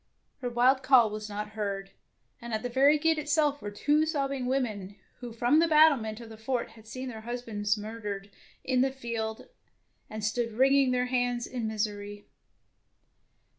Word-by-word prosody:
Her 250 -3 -3
wild 250 +3 +3
call 255 -5 +5
was 215 0 -6
not 210 +1 -4
heard, 200 -2 -4 0.5
and 235 -2 -4
at 220 - -4
the 245 - -2
very 275 +5 +4
gate 320 +1 +2
itself 295 -1 +1
were 205 - -4
two 295 +9 +1
sobbing 275 -4 -1
women 215 -7 -2 0.2
who 245 -1 -7
from 240 +6 +3
the 335 - +4
battlement 285 -9 +4
of 230 -1 -10
the 220 -1 -12
fort 235 0 -2
had 220 -1 -17
seen 255 +3 -6
their 225 -3 -7
husbands 220 -3 -2
murdered 210 -2 -6 0.3
in 255 -1 +1
the 270 - +3
field, 230 - -5 0.6
and 215 0 -6
stood 230 +1 -1
wringing 270 +3 +4
their 250 0 +1
hands 245 -1 0
in 240 -3 -4
misery. 205 -1 -4
240 Hz, 170 wpm, -29 LUFS, 215-265 Hz, 0.6 s, call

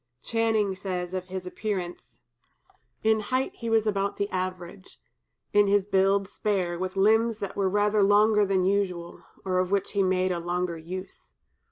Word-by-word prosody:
Channing 225 -3 +1
says 185 -2 -4
of 185 -1 -3
his 185 0 -6
appearance: 185 -2 -5 0.8
"In 220 0 +3
height 255 +5 -1
he 230 - -4
was 225 -1 +3
about 200 -1 -1
the 200 - 0
average; 185 0 -5 0.5
in 205 0 +5
his 200 -1 +3
build 195 0 +2
spare, 185 -5 -2
with 185 +1 -3
limbs 220 +3 +3
that 200 -3 -5
were 195 -1 +1
rather 205 +1 +2
longer 210 +1 +4
than 190 -2 +1
usual, 185 -3 -1 0.2
or 185 -1 +1
of 185 -1 0
which 200 0 0
he 200 - +1
made 185 0 +1
a 175 - -1
longer 175 0 -2
use. 185 +3 -9
195 Hz, 165 wpm, -27 LUFS, 185-205 Hz, 0.8 s, in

